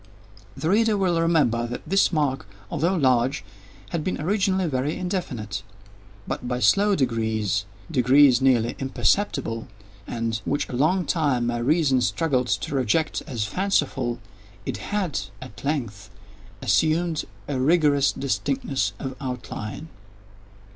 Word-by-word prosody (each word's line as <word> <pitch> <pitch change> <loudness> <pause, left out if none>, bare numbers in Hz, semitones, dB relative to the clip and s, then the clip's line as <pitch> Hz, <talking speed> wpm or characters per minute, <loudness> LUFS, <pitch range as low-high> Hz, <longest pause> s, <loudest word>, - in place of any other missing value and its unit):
The 160 - 0
reader 220 0 +3
will 180 -4 +1
remember 145 -9 +2
that 120 - -6
this 195 +3 +3
mark, 145 - 0 0.2
although 175 +4 +1
large, 130 -3 +2 0.5
had 170 -3 -2
been 185 - -2
originally 190 +2 +1
very 140 -1 -1
indefinite; 130 - -3 0.7
but, 125 - -4
by 125 0 -1
slow 200 - +4
degrees—degrees 115 - +2
nearly 120 -3 +3
imperceptible, 130 - 0 0.4
and 115 -1 -2
which 145 +1 -1
for - - -11
a - - -3
long 170 +7 +2
time 140 -6 +1
my 120 0 -1
reason 135 0 +2
struggled 125 +3 +1
to - - -1
reject 135 +4 +1
as 120 -8 -2
fanciful—it 120 - -2
had, 195 - -2 0.2
at 130 - -11
length, 120 -9 -3 0.5
assumed 160 0 +1 0.2
a 135 - -2
rigorous 145 -1 +3
distinctness 135 0 -1
of 130 -2 -5
outline. 125 +1 -5
135 Hz, 120 wpm, -24 LUFS, 120-165 Hz, 0.7 s, slow